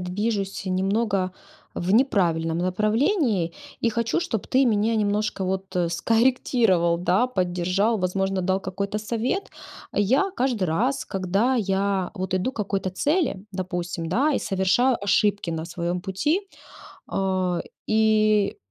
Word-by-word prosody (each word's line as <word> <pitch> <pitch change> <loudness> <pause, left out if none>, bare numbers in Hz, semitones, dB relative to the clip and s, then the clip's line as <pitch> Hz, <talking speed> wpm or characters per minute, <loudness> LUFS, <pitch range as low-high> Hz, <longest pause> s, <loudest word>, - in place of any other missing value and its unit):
движусь, 195 +1 -2
э, - - -1
немного 195 0 0 0.4
в 180 +2 -1
неправильном 170 -9 +2
направлении 210 - +1 0.3
и 230 - +2
хочу, 230 +6 0
чтобы 340 - -3
ты 265 +1 +4
мене 220 0 +2
немножко 210 -1 0
вот 190 0 -3
скорректировал, 225 -4 +2
да, 185 +7 +2
поддержал, 185 +1 0
возможно, 190 +1 0
дал 190 +1 0
какой-то 200 +2 -3
совет. 235 - -2 0.4
Я 260 - +2
каждый 245 -7 0
раз, 240 +12 0
когда 195 +7 0
я 195 -4 0
вот 185 -2 -4
иду 185 +7 0
к - - -26
какой-то 195 -3 -2
цели, 280 - 0
допустим, 175 -2 -4
да, 270 - +2
и - - +1
совершаю 205 +6 +2
ошибки 205 -2 +1
на 160 -1 -3
своем 175 +1 -3
пути. 295 - -1 0.6
А, 185 -2 0 0.3
и 215 -1 +3
200 Hz, 130 wpm, -24 LUFS, 185-230 Hz, 0.6 s, ты